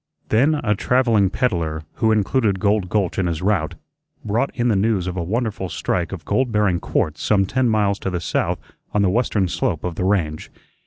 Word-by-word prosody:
Then 135 +8 +3
a 110 -8 0
travelling 115 -3 +2
peddler, 85 -8 -1
who 110 -2 +2
included 105 -1 +1
Gold 100 -2 +1
Gulch 95 -2 0
in 95 - +1
his 85 0 -3
route, 95 -6 0 0.5
brought 115 +6 +1
in 120 0 0
the 110 - +3
news 100 -2 +1
of 90 -1 -3
a 90 - -2
wonderful 105 0 -2
strike - - -2
of - - -7
gold 130 -2 +1
bearing 105 -5 +2
quartz 75 -3 -1
some 100 -2 +2
ten 125 +5 +1
miles 105 -2 +1
to - - -3
the 90 -1 -2
south 85 - -1 0.4
on 105 - +3
the 95 - +3
western 105 -4 +1
slope 85 -1 -2
of 90 - -2
the 85 - -3
range. 85 -6 0
100 Hz, 200 wpm, -21 LUFS, 90-110 Hz, 0.5 s, Then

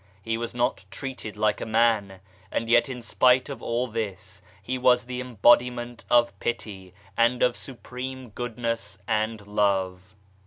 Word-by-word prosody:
He 115 +1 -1
was 115 +1 -4
not 120 -3 0
treated 110 0 -6
like 105 -1 +1
a - - -2
man 110 -4 +2 0.3
and 115 - -1
yet 120 +2 +4
in 125 -2 -6
spite 125 +3 +3
of 140 - -6
all 120 +2 -1
this 110 -5 -5 0.2
He 130 0 -3
was 125 -1 +4
the 125 0 -4
embodiment 120 0 +2
of 120 -5 +3
Pity 95 -6 -4 0.2
and 120 +2 +3
of 125 - +3
supreme 130 0 -8
Goodness 115 -2 -4
and 110 -1 -1
Love. 95 -2 0
115 Hz, 150 wpm, -26 LUFS, 105-125 Hz, 0.3 s, yet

